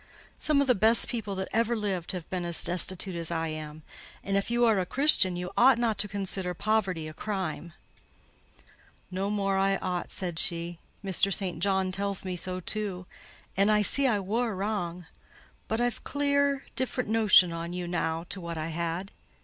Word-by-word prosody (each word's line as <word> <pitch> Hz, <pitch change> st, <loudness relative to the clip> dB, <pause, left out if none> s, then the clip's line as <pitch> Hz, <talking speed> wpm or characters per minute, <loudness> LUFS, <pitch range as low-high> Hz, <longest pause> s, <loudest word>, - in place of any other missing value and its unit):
Some 300 Hz, -2 st, +3 dB
of -, -, +2 dB
the 255 Hz, -, +4 dB
best 225 Hz, +2 st, +4 dB
people 215 Hz, -4 st, -4 dB
that 190 Hz, 0 st, -3 dB
ever 230 Hz, +1 st, +1 dB
lived 195 Hz, -6 st, -2 dB
have 180 Hz, -3 st, -6 dB
been 180 Hz, -1 st, -2 dB
as 170 Hz, -1 st, +2 dB
destitute 185 Hz, +1 st, +3 dB
as 170 Hz, -1 st, -3 dB
I 165 Hz, -1 st, -2 dB
am; 155 Hz, 0 st, -7 dB, 0.4 s
and 195 Hz, -, -2 dB
if 200 Hz, +2 st, 0 dB
you 240 Hz, 0 st, +2 dB
are 220 Hz, -4 st, +3 dB
a -, -, +1 dB
Christian, 255 Hz, -10 st, +4 dB
you 180 Hz, 0 st, -5 dB
ought 255 Hz, 0 st, +5 dB
not 225 Hz, -4 st, -1 dB
to 210 Hz, -, +1 dB
consider 190 Hz, -2 st, -3 dB
poverty 190 Hz, -6 st, -1 dB
a 155 Hz, -, -8 dB
crime." 175 Hz, -3 st, -5 dB, 1.4 s
"No 190 Hz, +2 st, -2 dB
more 195 Hz, -2 st, 0 dB
I 195 Hz, 0 st, +2 dB
ought," 180 Hz, -1 st, -4 dB
said 175 Hz, -4 st, -3 dB
she: 170 Hz, 0 st, -1 dB, 0.3 s
"Mr. 195 Hz, +1 st, +1 dB
St. 185 Hz, -3 st, -1 dB
John 190 Hz, 0 st, 0 dB
tells 195 Hz, 0 st, -2 dB
me 185 Hz, -1 st, -3 dB
so 185 Hz, +1 st, -4 dB
too; 190 Hz, -1 st, -3 dB, 0.5 s
and 195 Hz, +2 st, +3 dB
I 210 Hz, -1 st, +3 dB
see 275 Hz, +6 st, +6 dB
I 215 Hz, -5 st, +1 dB
wor 220 Hz, +3 st, -2 dB
wrang—but 185 Hz, +2 st, -6 dB
I've 240 Hz, -1 st, -1 dB
clear 285 Hz, 0 st, +1 dB
a -, -, -20 dB
different 255 Hz, -3 st, -2 dB
notion 205 Hz, -6 st, +5 dB
on 165 Hz, +1 st, -5 dB
you 180 Hz, 0 st, -4 dB
now 165 Hz, -1 st, -2 dB
to 190 Hz, -, -4 dB
what 170 Hz, -1 st, -6 dB
I 155 Hz, +1 st, -4 dB
had. 170 Hz, +3 st, -4 dB
190 Hz, 185 wpm, -28 LUFS, 175-215 Hz, 1.4 s, see